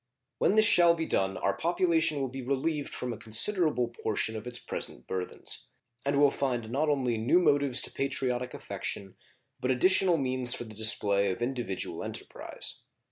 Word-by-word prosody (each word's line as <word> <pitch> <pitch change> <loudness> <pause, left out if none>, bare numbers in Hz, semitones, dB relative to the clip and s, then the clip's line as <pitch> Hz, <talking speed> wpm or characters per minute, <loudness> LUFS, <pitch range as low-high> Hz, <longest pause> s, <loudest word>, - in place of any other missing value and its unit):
When 200 - +3
this 215 0 +6
shall 170 -5 +6
be 165 -1 -3
done 95 -7 0
our - - 0
population 165 -3 +1
will 135 - -1
be 130 +1 -7
relieved 140 +3 -2
from 125 -1 -4
a - - -8
considerable 125 - +3
portion 110 -1 -2
of 110 +2 -6
its 120 0 -3
present - - -5
burthens, 90 -1 -5 0.4
and 140 +1 0
will 145 -1 +5
find 120 -6 -2
not 150 +4 0
only 125 -6 0
new 115 +10 +3
motives 140 -7 +3
to - - 0
patriotic 125 -2 -2
affection, 95 -1 -5 0.4
but 125 - -2
additional 180 +6 +4
means 130 -3 +1
for - - -5
the 110 -2 -11
display 100 -2 +2
of 95 +6 -3
individual 120 -6 -3
enterprise. - - -5
130 Hz, 170 wpm, -29 LUFS, 115-150 Hz, 0.4 s, this